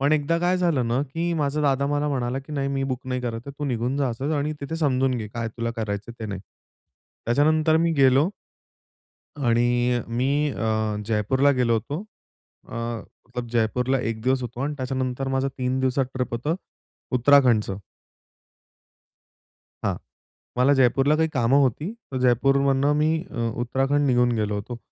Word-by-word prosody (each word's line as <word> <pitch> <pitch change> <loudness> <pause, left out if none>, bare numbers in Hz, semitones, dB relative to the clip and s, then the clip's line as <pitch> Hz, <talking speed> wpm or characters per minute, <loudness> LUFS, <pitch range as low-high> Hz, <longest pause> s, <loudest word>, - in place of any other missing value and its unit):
पण 140 +2 +2
एकदा 155 +2 +2
काय 180 +1 +2
झालं 165 -9 +1
ना 120 +3 +1
की 165 +5 -2
माझा 150 -1 0
दादा 140 -1 +2
मला 145 +1 0
म्हणाला, 130 -2 -1
की 140 +3 -10
"नाही 140 -1 -1
मी 135 0 -1
बुक 130 -2 -3
नाही 125 0 -2
करत 115 -2 -3
आहे. 140 - -6
तू 145 - -3
निघून 125 0 -1
जा 140 -2 +1
असंच 135 +6 -3
आणि 145 +1 -1
तिथे 160 +4 -4
समजून 135 -4 +1
घे 110 -2 -5
काय 115 +1 -4
तुला 115 0 -2
करायचंय 105 +1 -4
ते 110 - -3
नाही." 100 -2 -5 0.9
त्याच्यानंतर 155 +5 +3
मी 165 0 +2
गेलो. 135 +4 +5 1.2
आणि 120 +1 +2
मी 125 +3 0 0.2
अ, 110 -3 -1
जयपूरला 115 +6 +2
गेलो 120 -2 +2
होतो. 120 +8 -2 0.7
अ, - - -9 0.5
मतलब 125 -1 -5
जयपूरला 125 +3 +1
एक 115 -2 -3
दिवस 130 0 +1
होतो 120 +1 -6
आणि 145 +2 -1
त्याच्यानंतर 130 0 -2
माझं 135 +1 0
3 130 +1 0
दिवसात 130 +1 +1
ट्रिप 125 -2 -2
होतं 145 +8 -1 0.6
उत्तराखंडचं. 120 -6 +4 2.1
हां. - - +1 0.6
मला 135 +3 +5
जयपूरला 135 +3 +3
काही 160 0 +2
कामं 130 +1 +3
होती. 145 - 0 0.2
तर - - -2
जयपूरमधनं 135 +3 +3
मी 155 +1 +3 0.2
अ, - - -7 0.2
उत्तराखंड 135 +4 +1
निघून 125 -2 +3
गेलो 105 -1 0
होतो. 110 +4 -5
130 Hz, 160 wpm, -24 LUFS, 120-145 Hz, 2.1 s, गेलो